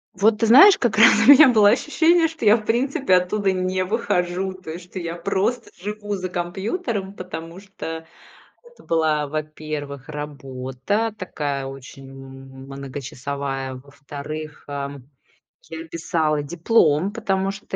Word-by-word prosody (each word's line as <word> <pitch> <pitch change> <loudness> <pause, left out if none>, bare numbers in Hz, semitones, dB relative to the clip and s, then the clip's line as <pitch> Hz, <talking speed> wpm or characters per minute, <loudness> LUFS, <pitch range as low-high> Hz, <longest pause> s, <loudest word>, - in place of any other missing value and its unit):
Вот 210 +3 +3
ты 225 - +2
знаешь, 300 - +8
как 230 -4 0
раз 230 +2 +8 0.2
у - - +11
меня 285 -1 +9
было 210 -4 +5
ощущение, 325 +6 +3
что 320 -8 -6
я, 210 +2 +7
в 215 - -5
принципе, 265 - +1
оттуда 190 +2 +1
не 185 0 -1
выхожу. 185 -3 -1
То 185 -4 -10
есть, 175 +2 -8
что 190 - -6
я 170 -1 -5
просто 200 +7 -1
живу 205 +1 -4
за 185 -1 -5
компьютером, 195 - -3
потому 180 -2 -8
что 165 -5 -8 0.6
это 480 0 -19
была, 155 -3 +1
во-первых, 150 -2 -6
работа 145 - -4
такая, 145 -7 -4
очень 135 0 -10
м 135 0 -12
многочасовая. 135 0 -5
Во-вторых, 145 +3 -9
ам, 140 -2 -6 0.6
я 165 0 -7
писала 160 -2 -1
диплом, 170 +1 +2
потому 195 -4 -1
что 195 +1 -8
175 Hz, 140 wpm, -22 LUFS, 145-205 Hz, 0.6 s, у